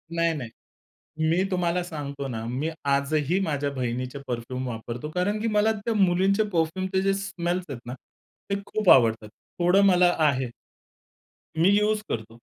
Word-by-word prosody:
नाही, 170 0 +2
नाही. 125 -7 -5 0.8
मी 175 +3 +2
तुम्हाला 180 -1 0
सांगतो 140 -5 -5
ना, 115 -3 -4
मी 140 +6 -2 0.2
आजही 145 +5 +1
माझ्या 145 -4 -1
बहिणीचे 125 +1 -3
परफ्यूम 125 +1 -4
वापरतो 120 +5 -5
कारण 205 +4 0
की 230 - 0
मला 215 0 +3
त्या 225 +3 -2
मुलींचे 195 +2 +3
परफ्यूमचे 185 +4 0
जे 195 0 +2
स्मेल्स 180 -2 -2
आहेत 135 -4 -5
ना, 120 - -6 0.6
ते 200 - +1
खूप 210 -2 0
आवडतात. 115 -4 +4 0.3
थोडं 180 +3 +4
मला 180 -2 +5
आहे. 135 -5 +2 1.1
मी 170 +4 +5
युज 210 0 +1
करतो. 115 +1 -5
165 Hz, 150 wpm, -25 LUFS, 130-190 Hz, 1.1 s, मला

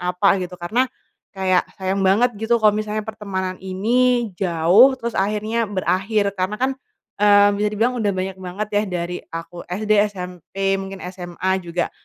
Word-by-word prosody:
apa 180 +2 +2
gitu, 180 0 -6
karena 235 +9 +1 0.5
kayak 185 -1 +2
sayang 190 +1 -1
banget 230 +6 +4
gitu 235 +1 +2
kalo 215 - +7
misalnya 215 0 -2
pertemanan 190 -4 -4
ini 235 +5 +1
jauh, 185 +8 +5
terus 235 -1 -4
akhirnya 215 +3 0
berakhir. 200 +1 0
Karena 190 +3 -1
kan, 260 - +2 0.5
eee, 205 0 +6
bisa 210 0 +1
dibilang 230 +4 +1
udah 205 -2 +1
banyak 190 0 -3
banget 190 +3 -4
ya 205 - +3
dari 180 -1 -3 0.2
aku 165 +1 -7
SD, 210 +4 -1 0.2
SMP, 190 +1 -3
mungkin 195 0 -7
SMA 180 0 -4
juga, 175 0 -2
195 Hz, 155 wpm, -21 LUFS, 185-215 Hz, 0.5 s, kalo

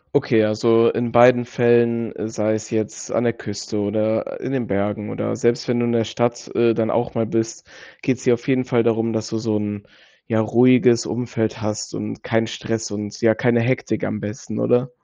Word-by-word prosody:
Okay, 115 -6 +3
also 115 +2 +3
in 120 -1 -2
beiden 120 +1 +6
Fällen, 120 -2 +2 0.2
sei 110 -1 0
es 110 0 -4
jetzt 110 -2 -3
an 115 - 0
der 115 - +2
Küste 105 -1 -6
oder 110 +2 -1
in 130 - -4
den 130 -3 -1
Bergen 105 +1 -2
oder - - -3
selbst 120 0 0
wenn 120 -1 +1
du 120 - +1
in - - 0
der 115 -1 +1
Stadt, 120 +2 -2
äh, 115 -1 +4
dann 110 0 -1
auch 120 +1 -1
mal 115 -1 +1
bist, 115 +1 -3 0.3
geht's 130 -1 -1
dir 125 -2 +4
auf 120 +3 -12
jeden 130 -1 +2
Fall 125 -2 +1
darum, 115 0 +1
dass 110 -1 -2
du 110 0 -3
so 110 -1 -1
'n 105 -1 -4 0.4
ja 110 - +1
ruhiges 120 +1 +4
Umfeld 115 -1 -3
hast 105 +1 -4
und 105 +3 -6
keinen 115 -2 0
Stress 115 -1 -4
und, 105 0 -6
ja, 110 -2 +3
keine 120 -1 +2
Hektik 115 -2 -1
am 105 -1 -3
besten, 105 +1 -6
oder? 125 +1 +2
115 Hz, 205 wpm, -21 LUFS, 110-120 Hz, 0.4 s, beiden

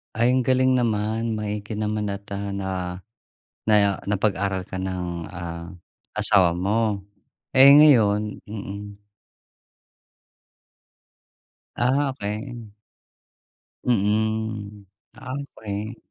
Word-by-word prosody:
Ay, 120 +2 +3
ang 130 0 +2
galing 130 0 +4
naman, 110 -1 0
maigi 105 0 -4
naman, 105 0 -1
at, 100 0 -4
ah, 95 -2 -3 0.7
naya 100 -2 +4
na 105 +1 0
napag-aral 100 -2 0
ka - - -7
ng, 90 -1 -3 0.2
ah, 85 -1 -6 0.5
asawa 100 -5 +4
mo. 105 +3 0 0.6
Eh, 135 +1 +9
ngayon 110 -8 +5
mm. 100 -1 -7 2.8
Ah, 135 +3 +2
okey. 115 0 -6 1.1
Mm. 110 -2 -1 0.3
Ah, 130 - -8 0.2
okey. 105 +2 -5
105 Hz, 90 wpm, -24 LUFS, 100-115 Hz, 2.8 s, Eh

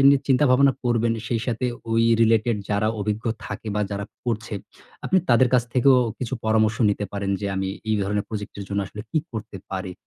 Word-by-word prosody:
নিয়ে 140 -1 +5
চিন্তা 135 +2 +4
ভাবনা 135 +2 +5
করবেন। 115 -1 +2
সেই 115 -2 -1
সাথে 120 -1 -1 0.3
ওই 115 0 +3 0.2
রিলেটেড 115 0 +3
যারা 105 +1 +2
অভিজ্ঞ 105 +3 -2 0.2
থাকে 110 +1 -6
বা 105 - 0
যারা 100 0 -3 0.2
করছে। 115 -2 -2 0.5
আপনি 190 - +3
তাদের 120 +1 +5
কাছ 125 - +5
থেকেও 130 +1 +6 0.2
কিছু 125 0 -3
পরামর্শ 110 0 +2
নিতে 105 0 -2
পারেন। 100 -1 -2
যে, 100 - -2
"আমি 95 0 -1 0.2
এই 110 - +3
ধরনের 105 +1 -1
প্রজেক্টের 105 -2 -6
জন্য 100 0 -1
আসলে 105 +2 -8
কী 160 - +2
করতে 110 -2 -6
পারি?" 95 -1 -4
110 Hz, 190 wpm, -24 LUFS, 105-120 Hz, 0.5 s, থেকেও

